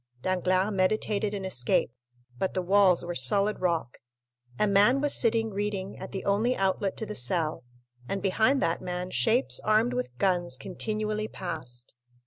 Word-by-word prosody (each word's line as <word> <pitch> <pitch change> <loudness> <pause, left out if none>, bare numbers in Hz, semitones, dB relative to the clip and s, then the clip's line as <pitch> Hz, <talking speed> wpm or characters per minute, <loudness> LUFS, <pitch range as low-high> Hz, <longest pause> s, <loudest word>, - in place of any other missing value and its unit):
Danglars 185 +2 +1
meditated 205 +2 0
an 195 -1 -5
escape; 125 -10 +1 0.5
but 190 - -1
the 185 - +1
walls 185 -2 +4
were 175 - -3
solid 200 +10 +1
rock, 170 -8 -1 0.6
a - - +2
man 205 +6 +4
was 290 0 +3
sitting 225 -1 +1
reading 200 -1 -3
at 190 - -8
the 190 - -5
only 215 +6 +1
outlet 195 0 0
to 220 - -4
the 210 - -6
cell, 155 +2 0 0.5
and 195 - -1
behind 220 +8 +2
that 165 - 0
man 180 0 -4
shapes 240 +3 +2
armed 215 +3 +2
with 250 - -4
guns 175 -6 0
continually 215 +5 -3
passed. 130 - -7
195 Hz, 155 wpm, -27 LUFS, 180-215 Hz, 0.6 s, walls